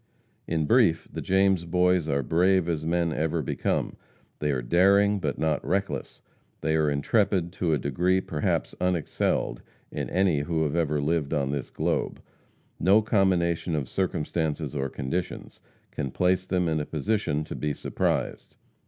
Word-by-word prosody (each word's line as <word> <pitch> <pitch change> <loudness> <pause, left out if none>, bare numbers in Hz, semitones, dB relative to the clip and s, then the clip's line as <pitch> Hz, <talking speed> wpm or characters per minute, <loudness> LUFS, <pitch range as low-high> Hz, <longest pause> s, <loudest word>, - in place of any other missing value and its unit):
In 80 -2 0
brief, 90 - +3
the - - -4
James 95 -2 +2
Boys 90 -1 +2
are 70 -1 +1
brave 90 +5 +2
as 80 -3 -1
men 85 0 0
ever 80 +1 -1
become; - - -2 0.4
they 75 - -1
are 65 -3 -1
daring, 100 +8 +4
but 75 -6 -2
not 80 -1 0
reckless; 100 +1 -2 0.4
they 80 0 +1
are 80 -1 +2
intrepid 85 +4 +1
to 90 -3 -1
a 75 - +3
degree 85 +8 +1
perhaps 80 -5 -2
unexcelled 90 -3 0 0.3
in - - -4
any 90 -5 +2
who 80 +2 -1
have 75 0 -1
ever 75 -3 +1
lived 80 0 0
on 70 -2 0
this 70 -2 -3
globe; - - -2 0.6
no 100 +5 +4
combination 90 -5 +1
of 70 -4 -2
circumstances 80 -3 -2
or 70 -1 -1
conditions 80 +8 -4 0.3
can 70 - -3
place 90 +5 +1
them 90 -2 +1
in 80 -1 0
a 75 - -3
position 80 -1 -1
to - - -7
be 75 - -2
surprised. - - -2
85 Hz, 155 wpm, -26 LUFS, 75-90 Hz, 0.6 s, daring